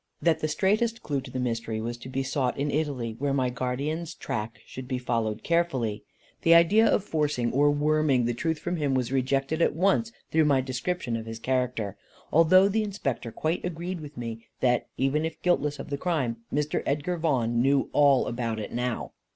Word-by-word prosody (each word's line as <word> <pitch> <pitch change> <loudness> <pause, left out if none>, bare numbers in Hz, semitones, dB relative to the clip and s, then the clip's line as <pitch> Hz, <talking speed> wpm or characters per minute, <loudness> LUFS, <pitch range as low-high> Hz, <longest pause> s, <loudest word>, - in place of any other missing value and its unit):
That 165 -2 +2
the 155 - 0
straightest 215 +9 +1
clue 140 -2 -1
to 130 - -10
the 130 - -5
mystery 115 -2 -2
was 115 +2 -3
to 125 - -10
be 135 +1 -1
sought 130 -1 -1
in 145 +1 -1
Italy, 135 -7 -2
where 140 0 0
my 130 -2 +1
guardian's 145 +7 -3
track 115 +1 -4
should 130 -1 -8
be 130 -1 -1
followed 115 -3 -2
carefully. 135 -11 0 0.4
The 165 0 +6
idea 205 +7 +6
of - - +2
forcing, 150 - 0
or 145 +3 +4
worming, 145 -3 +2
the 120 - 0
truth 160 +6 -1
from 175 +3 -3
him 145 -4 0
was 125 -1 0
rejected 135 +4 0
at 155 - +3
once 195 +6 +2 0.2
through 160 -1 +4
my 140 -3 +4
description 130 +1 -2
of 115 0 -5
his 115 0 -5
character; 125 -4 -1 0.4
although 185 +4 +6
the 215 +2 +1
Inspector 140 - -3
quite 160 +2 -1
agreed 175 0 -4
with 150 -2 -10
me, 115 -1 -6
that, 125 -1 +2
even 135 +4 +1
if 160 0 -4
guiltless 150 -5 +1
of 145 - -8
the 140 - -2
crime, 140 -10 -1
Mr. 150 +1 0
Edgar 150 +5 0
Vaughan 120 -8 +1
knew 135 +1 +2
all 140 -3 +5
about 115 -2 -2
it 105 - -5
now. 125 0 -2
140 Hz, 195 wpm, -27 LUFS, 125-160 Hz, 0.4 s, The